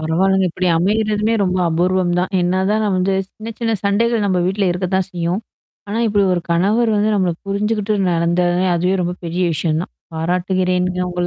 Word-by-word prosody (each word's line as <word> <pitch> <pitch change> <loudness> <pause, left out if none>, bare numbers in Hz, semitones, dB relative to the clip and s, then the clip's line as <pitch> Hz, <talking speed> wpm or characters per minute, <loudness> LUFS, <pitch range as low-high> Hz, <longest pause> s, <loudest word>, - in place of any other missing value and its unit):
பரவால்லங்க 185 +4 +2
இப்டி 180 +2 -2
அமையறதுமே 215 +4 +1
ரொம்ப 185 -1 0
அபூர்வம் 175 +2 +1
தான். 180 +2 -1
என்னா 180 +2 +1
தான் 215 +1 +1
நம்ம 200 -3 +1
வந்து 190 +1 +1
சின்ன, 225 +1 -9
சின்ன 230 -1 0
சண்டைகள் 220 +2 +1
நம்ம 185 -2 +1
வீட்ல 195 0 0
இருக்கத்தான் 185 +1 -1
செய்யும். 175 +3 -2 0.5
ஆனா, 215 - -2
இப்டி 205 -1 +2
ஒரு 175 - -1
கணவர் 210 +7 +2
வந்து 210 +1 +2
நம்மள 185 -4 +1
புரிஞ்சுகிட்டு 210 +1 -1 0.2
நடந்ததே, 175 +2 +1
அதுவே 180 +3 +1
ரொம்ப 175 +1 -2
பெரிய 175 +2 -1
விஷயம் 155 0 0
தான். - - -10 0.2
பாராட்டுகிறேன்ங்க 180 +2 0
உங்கள. 175 0 -2
185 Hz, 170 wpm, -18 LUFS, 175-205 Hz, 0.5 s, பரவால்லங்க